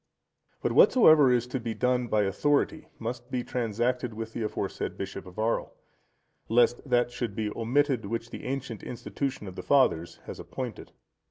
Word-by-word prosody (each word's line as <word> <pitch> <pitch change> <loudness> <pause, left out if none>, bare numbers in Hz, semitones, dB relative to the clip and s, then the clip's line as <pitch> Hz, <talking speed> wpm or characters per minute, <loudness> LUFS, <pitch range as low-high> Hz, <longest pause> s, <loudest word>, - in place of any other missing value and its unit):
But - - +1
whatsoever 155 - +7
is 120 -1 +2
to 125 +1 -3
be 115 -1 -4
done 125 -1 +1
by 105 -2 +2
authority, 145 - +1
must 120 +2 -5
be 125 -1 -2
transacted 120 0 -1
with 110 0 -6
the - - -4
aforesaid 105 - -3
bishop 95 -1 -6
of 90 - -13
Arles, 110 +2 0 0.8
lest 120 +1 +4
that 120 -1 +3
should 120 -4 -4
be 110 -2 -2
omitted, 125 0 +1
which 115 +2 -4
the - - -8
ancient 130 -4 -4
institution 130 0 -4
of 95 - -8
the - - -5
fathers 105 - +2
has - - -8
appointed. - - -6
120 Hz, 165 wpm, -28 LUFS, 110-125 Hz, 0.8 s, whatsoever